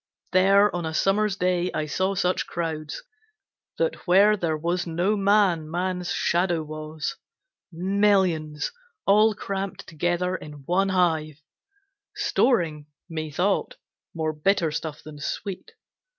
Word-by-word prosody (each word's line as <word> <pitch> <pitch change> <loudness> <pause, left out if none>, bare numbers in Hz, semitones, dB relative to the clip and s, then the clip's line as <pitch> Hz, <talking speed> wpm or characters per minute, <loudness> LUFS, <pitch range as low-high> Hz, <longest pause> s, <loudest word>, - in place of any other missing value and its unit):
There 195 +2 +5
on 175 - -2
a 160 -1 -3
summer's 200 +3 +2
day 180 -2 0
I 155 - -1
saw 185 +6 -1
such 185 -1 0
crowds 160 -3 -4 0.7
That - - -2
where 200 +4 +6
there 165 -5 -1
was 170 +3 -1
no 175 +6 +1
man 195 -6 +3
man's 180 +1 -2
shadow 175 -2 +1
was; 155 0 -5 0.5
Millions 180 -4 +1 0.3
all 215 +2 +5
cramped 195 -1 -4
together 175 +3 -1
in 150 -5 -9
one 190 +4 +2
hive, 160 -5 0 0.7
Storing, 160 - +1 0.2
methought, 165 +5 -1 0.4
more 160 -1 -1
bitter 165 +1 +1
stuff 155 -1 -5
than 150 -1 -10
sweet. 195 - -5
175 Hz, 120 wpm, -25 LUFS, 155-195 Hz, 0.7 s, where